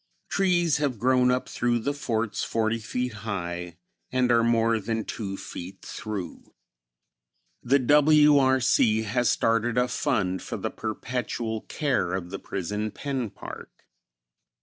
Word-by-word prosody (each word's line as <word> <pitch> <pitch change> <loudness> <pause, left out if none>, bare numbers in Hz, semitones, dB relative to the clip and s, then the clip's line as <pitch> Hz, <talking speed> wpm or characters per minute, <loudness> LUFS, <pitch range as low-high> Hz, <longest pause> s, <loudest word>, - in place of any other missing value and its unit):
Trees 175 -5 +2
have 140 -5 -1
grown 125 +2 +3
up 125 0 0
through 120 0 0
the 140 +5 -1
forts 115 -7 -2
forty 115 0 0
feet 125 +2 -3
high 90 -5 -4 0.3
and 125 -1 +2
are 115 -1 +5
more 115 -1 +3
than 110 +2 -2
two 95 -3 -5
feet 95 +1 -8
through. 100 -6 -7 1.1
The 135 +3 +3
W. 150 +2 +5
R. 130 -1 +4
C. 110 -3 +3
has 120 +2 +1
started 115 +1 +1
a 125 0 +3
fund 95 -7 0
for - - -5
the - - -3
perpetual 120 -3 -3
care 130 - 0
of 90 -1 -5
the 95 - -5
Prison 105 +3 -3
Pen 130 0 -3
Park. - - -11
115 Hz, 140 wpm, -26 LUFS, 105-130 Hz, 1.1 s, are